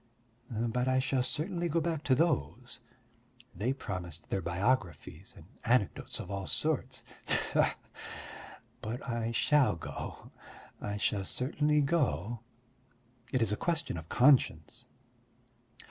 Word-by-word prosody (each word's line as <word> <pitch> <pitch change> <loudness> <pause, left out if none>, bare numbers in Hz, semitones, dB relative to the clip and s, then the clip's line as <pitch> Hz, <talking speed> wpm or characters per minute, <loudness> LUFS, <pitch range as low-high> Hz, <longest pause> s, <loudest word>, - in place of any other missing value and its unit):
But 120 +2 0
I 130 0 +3
shall 130 0 +2
certainly 170 +6 -1
go 165 +2 +2
back 160 -2 -1
to 130 - +5
those. 155 - 0 0.8
They 115 +5 0
promised 90 - -5
their 95 - +1
biographies 90 - -1
and 80 - -13 0.2
anecdotes 115 -4 +1
of 90 - -6
all 100 -1 -3
sorts. 130 -4 0 0.2
Tfoo! - - +3 1.1
But 120 +6 -5
I 115 -2 -1
shall 145 +1 +4
go, 85 - -7 0.5
I 105 0 -3
shall 105 -1 0
certainly 150 - +1
go; 140 -6 +1 0.9
it 130 -3 +2
is 110 - +2
a - - +2
question 165 - 0
of 80 -1 -7
conscience! 130 +1 +3
125 Hz, 120 wpm, -32 LUFS, 100-145 Hz, 1.1 s, to